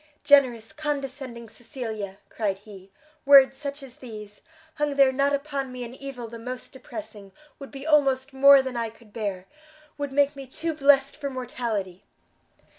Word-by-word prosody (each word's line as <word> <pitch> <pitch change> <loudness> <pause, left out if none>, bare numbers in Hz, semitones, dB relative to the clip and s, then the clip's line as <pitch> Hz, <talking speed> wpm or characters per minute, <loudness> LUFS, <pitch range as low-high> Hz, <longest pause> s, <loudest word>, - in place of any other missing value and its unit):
"Generous, 250 -6 +4
condescending 275 -5 -5
Cecilia!" 220 -4 -7
cried 205 -4 -2
he; 195 -2 -14 0.3
"Words 275 -1 +7
such 280 +1 -6
as 255 -2 -12
these, 210 -4 -10 0.3
hung 295 -2 -1
there 275 -1 +5
not 275 +2 +1
upon 280 -2 -2
me 250 -1 -6
an 240 0 -8
evil 265 -3 -7
the 230 +1 -9
most 250 +2 -7
depressing, 225 -7 -10 0.3
would 275 - -9
be 275 0 -9
almost 275 -4 +2
more 275 0 +7
than 260 -1 -5
I 230 -1 -2
could 220 -1 -20
bear 200 -5 -4 0.5
would 285 -1 -3
make 285 +1 +2
me 275 -1 -9
too 325 +5 -3
blest 275 -2 +4
for 285 -2 -4
mortality!" 230 -8 -4
260 Hz, 160 wpm, -25 LUFS, 225-280 Hz, 0.5 s, Words